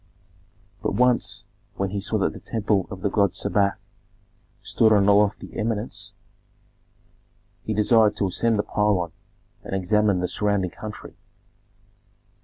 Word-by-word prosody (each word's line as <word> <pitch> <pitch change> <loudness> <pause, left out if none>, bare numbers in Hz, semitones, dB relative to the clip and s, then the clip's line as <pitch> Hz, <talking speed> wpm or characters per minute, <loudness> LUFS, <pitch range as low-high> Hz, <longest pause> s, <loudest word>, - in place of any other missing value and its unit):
But - - -1
once, 125 +1 +1 0.3
when 95 -1 -2
he 100 - -2
saw - - -1
that - - 0
the - - -10
temple 105 -4 -1
of 95 - -8
the 100 - 0
god 100 -4 +2
Sebak 100 0 +1 0.9
stood 110 -1 +2
on 100 -2 +4
a 100 - +6
lofty 105 0 +1
eminence, 110 -1 -3 1.5
he 110 - -3
desired 105 0 +4
to 100 - 0
ascend 115 +5 +1
the 105 - +1
pylon 100 -5 0 0.5
and - - -4
examine 100 +1 +2
the 90 - -1
surrounding 100 -3 0
country. 105 -1 -9
105 Hz, 135 wpm, -24 LUFS, 100-110 Hz, 1.5 s, a